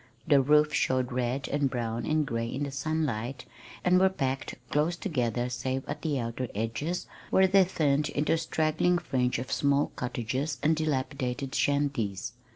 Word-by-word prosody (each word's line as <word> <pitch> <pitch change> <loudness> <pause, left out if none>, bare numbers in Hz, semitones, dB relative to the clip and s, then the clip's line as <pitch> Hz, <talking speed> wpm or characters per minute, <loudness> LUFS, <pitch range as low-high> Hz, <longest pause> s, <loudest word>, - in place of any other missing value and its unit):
The 145 -3 +6
roofs 150 +2 +4
showed 130 -3 +1
red 125 +2 -1
and 145 -1 +1
brown 115 -2 -3
and 155 -1 +2
gray 115 -2 -2
in 135 +4 -3
the 140 - -3
sunlight, 135 -4 -2 0.4
and 180 0 +5
were 190 0 +5
packed 135 -7 -2 0.2
close 155 +4 +2
together 125 - -1
save 130 +2 -3
at 145 - -4
the 150 -4 -1
outer 115 +2 -3
edges, 115 - -2 0.2
where 190 - +5
they 190 +1 +6
thinned 150 -4 +1
into 150 +3 +1
a - - +2
straggling 160 +2 +1
fringe 125 -7 0
of 125 +2 -5
small 140 0 +2
cottages 130 +4 -2
and 160 +2 +4
dilapidated 135 -3 -2
shanties. 130 -9 0
140 Hz, 165 wpm, -29 LUFS, 125-155 Hz, 0.4 s, The